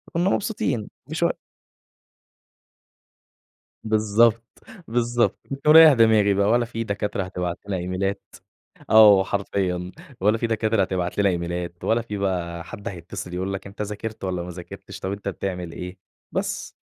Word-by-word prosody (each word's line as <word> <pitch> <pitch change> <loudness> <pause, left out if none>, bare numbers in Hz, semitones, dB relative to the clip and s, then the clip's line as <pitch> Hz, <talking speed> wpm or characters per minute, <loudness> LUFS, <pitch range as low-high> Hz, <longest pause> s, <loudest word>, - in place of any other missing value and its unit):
كنا 175 +3 +2
مبسوطين 195 - -1 0.2
مش - - -1 2.6
بالضبط، 110 +1 +3 0.4
بالضبط 120 0 +1 0.3
باريّح 155 -1 +9
دماغي 110 -4 +4
بقى، 100 +1 +2
ولا 120 +1 +3
في 115 0 -4
دكاترة 100 -2 -2
هتبعت 90 -1 -4
لنا 95 - -1
إيميلات 95 +2 -2 0.7
آه 105 -3 +8
حرفيًا، 95 -2 -2 0.3
ولا 105 +3 +3
في 115 - -1
دكاترة 110 -2 +1
هتبعت 90 -1 -2
لنا 100 -1 +4
إيميلات 85 0 -4
ولا 115 +1 +2
في 105 -3 -6
بقى 85 -3 -2
حد 100 +4 -9
هيتصل 90 -1 -7
يقول 95 +2 -2
لك 95 0 -6
أنت 100 +2 -8
ذاكرت 105 +1 -5
والَّا 90 -2 -2
ما 90 - -7
ذاكرتش، 90 0 -9
طَب 95 - -3
أنت 100 0 -4
بتعمل 90 -3 -4
إيه، 90 +1 -7 0.3
بس - - -3
100 Hz, 140 wpm, -24 LUFS, 90-110 Hz, 2.6 s, باريّح